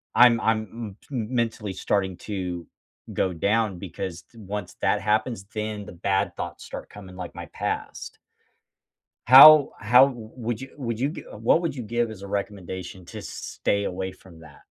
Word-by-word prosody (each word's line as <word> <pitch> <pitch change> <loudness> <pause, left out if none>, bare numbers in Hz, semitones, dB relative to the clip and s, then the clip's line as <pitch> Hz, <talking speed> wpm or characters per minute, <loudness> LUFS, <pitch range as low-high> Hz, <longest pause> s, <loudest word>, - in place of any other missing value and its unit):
I'm 120 -1 +7
I'm 110 0 +2
m 110 -4 -7
t - - -24
m 120 +1 -3
mentally 110 -3 -1
starting 95 -1 -1
to 90 -5 -4 0.5
go 95 - 0
down 100 +2 0
because 90 0 -6
d 115 - -23
once 100 -2 -6
that 105 - +2
happens, 105 +1 0
then 105 -2 -4
the - - -10
bad 95 +2 -1
thoughts - - -6
start - - -8
coming 95 -3 -12
like 90 -2 -7
my - - -7
past. - - -4 1.1
How 145 +3 +10
how 125 +5 +6
w 120 -5 -8
would 120 -2 -3
you 135 - -8
would 115 -5 -3
you 135 - +1
gi 160 - -7
what 115 +10 +2
would 160 -5 -2
you 125 - -5
give 120 +1 -1
as 100 - -10
a 100 - -8
recommendation 95 -2 -5
to - - -8
stay 100 0 -2
away 95 0 -3
from 90 -4 -17
that? 80 -2 -15
105 Hz, 180 wpm, -25 LUFS, 95-115 Hz, 1.1 s, How